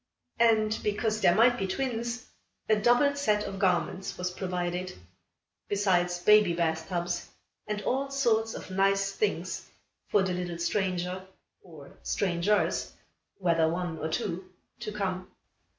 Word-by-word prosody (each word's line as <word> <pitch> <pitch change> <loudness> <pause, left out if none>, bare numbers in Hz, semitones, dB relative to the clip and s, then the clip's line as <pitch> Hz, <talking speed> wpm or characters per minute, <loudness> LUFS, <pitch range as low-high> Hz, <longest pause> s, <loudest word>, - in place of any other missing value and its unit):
And, 220 -2 +3
because 215 +1 0
there 175 - +5
might 245 +3 +5
be 195 - -1
twins, 240 +2 -2 0.4
a 215 - +5
double 245 +7 +4
set 215 -7 +1
of 195 -1 -5
garments 185 0 0
was 180 0 -2
provided, 180 -1 -3 0.7
besides 180 -3 +2
baby 210 0 +5
bathtubs 170 +1 -1 0.4
and 210 -1 -3
all 270 +2 0
sorts 225 -5 +1
of - - -8
nice 195 +1 +2
things 425 - -2 0.4
for 205 - +3
the 185 -1 -1
little 175 -1 -3
stranger 185 +1 -1 0.3
or 155 -6 -13
strangers 190 +2 0 0.4
whether 165 -4 +2
one 170 -1 -3
or 160 - -2
two 180 +3 -3 0.3
to 215 - -5
come. 185 -3 -3
195 Hz, 130 wpm, -29 LUFS, 175-215 Hz, 0.7 s, there